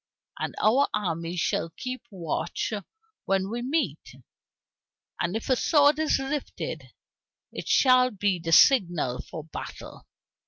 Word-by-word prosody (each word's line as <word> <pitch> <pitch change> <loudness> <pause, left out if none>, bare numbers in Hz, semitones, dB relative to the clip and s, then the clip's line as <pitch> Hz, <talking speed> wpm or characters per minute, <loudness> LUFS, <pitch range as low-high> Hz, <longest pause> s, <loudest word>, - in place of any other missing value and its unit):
"And - - -3
our 255 +7 +4
armies 170 -3 -3
shall 165 - 0
keep 255 0 -5
watch 180 +2 -3 0.5
when 195 +1 0
we 240 +1 -3
meet, 295 +6 -2 1.0
and 175 +3 -1
if 225 - -4
a 260 - +3
sword 290 +2 +4
is 315 - +2
lifted 285 - -4 0.7
it - - -7
shall 255 -1 +5
be 200 -4 -1
the 165 0 -4
signal 175 - +4
for 160 - -8
battle." 160 - -9
215 Hz, 125 wpm, -26 LUFS, 175-270 Hz, 1.0 s, shall